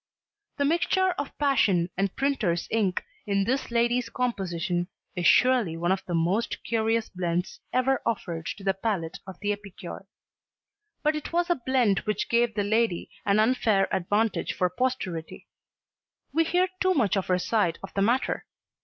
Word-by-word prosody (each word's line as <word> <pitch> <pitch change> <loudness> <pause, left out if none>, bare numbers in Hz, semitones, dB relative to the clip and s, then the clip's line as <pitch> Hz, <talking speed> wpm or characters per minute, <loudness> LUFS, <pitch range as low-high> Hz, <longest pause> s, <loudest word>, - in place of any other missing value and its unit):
The 285 - +1
mixture 350 +4 +2
of 285 - -5
passion 195 -12 +2
and 195 0 -1
printer's 240 -12 0
ink 205 -5 +1 0.2
in 200 -1 +2
this 255 +7 -1
lady's 240 +1 +1
composition 180 -7 -1 0.3
is 175 -2 +2
surely 245 -10 +4
one 175 +2 0
of 190 0 0
the 175 - -1
most 180 +8 0
curious 225 0 +1
blends 180 -1 -2
ever 255 +1 +2
offered 170 -8 -3
to 200 - -11
the 195 0 +2
palate 190 -5 -2
of 190 -2 -9
the 205 0 0
epicure. 195 -2 -9 1.0
But 305 0 +2
it 305 - -5
was 345 +1 +1
a - - +4
blend 245 -7 +3
which 210 - -2
gave 235 -1 +2
the 205 - +1
lady 215 -3 0 0.2
an 200 +1 +4
unfair 215 -4 +3
advantage 205 +5 0
for 180 -2 0
posterity. 185 -8 -3 0.9
We 330 0 +3
hear 360 +3 +2
too 375 -1 +2
much 220 - +2
of 195 - -1
her 180 - +3
side 180 -3 +1
of 195 - -8
the 195 - 0
matter. 240 +6 +1
210 Hz, 160 wpm, -27 LUFS, 185-250 Hz, 1.0 s, surely